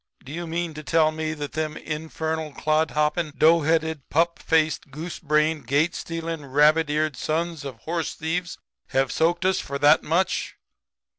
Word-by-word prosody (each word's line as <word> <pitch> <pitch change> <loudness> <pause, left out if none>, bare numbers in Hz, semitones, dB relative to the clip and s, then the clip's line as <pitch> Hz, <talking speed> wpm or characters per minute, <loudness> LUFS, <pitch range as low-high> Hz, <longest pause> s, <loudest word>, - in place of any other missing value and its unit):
'Do 130 - -10
you 170 +2 -5
mean 170 0 -2
to 155 - -7
tell 155 +1 +3
me 155 0 -3
that 145 -1 -5
them 155 0 -2
infernal 160 0 -4
clod 155 +2 +1
hopping, 150 +2 0
dough 165 +2 +5
headed, 160 -2 0
pup 170 +2 +1
faced, 155 -2 +1
goose 160 +5 -7
brained, 150 -2 +1
gate 150 +6 +2
stealing, 165 -2 -5
rabbit 150 +3 +3
eared 155 -1 0
sons 165 +1 -2
of 135 -3 -6
horse 165 0 -3
thieves 170 +2 -3 0.3
have 135 -2 +1
soaked 170 +3 +1
us 190 0 +3
for 140 - -4
that 145 +2 +5
much?' 170 +4 0
155 Hz, 165 wpm, -24 LUFS, 150-165 Hz, 0.3 s, dough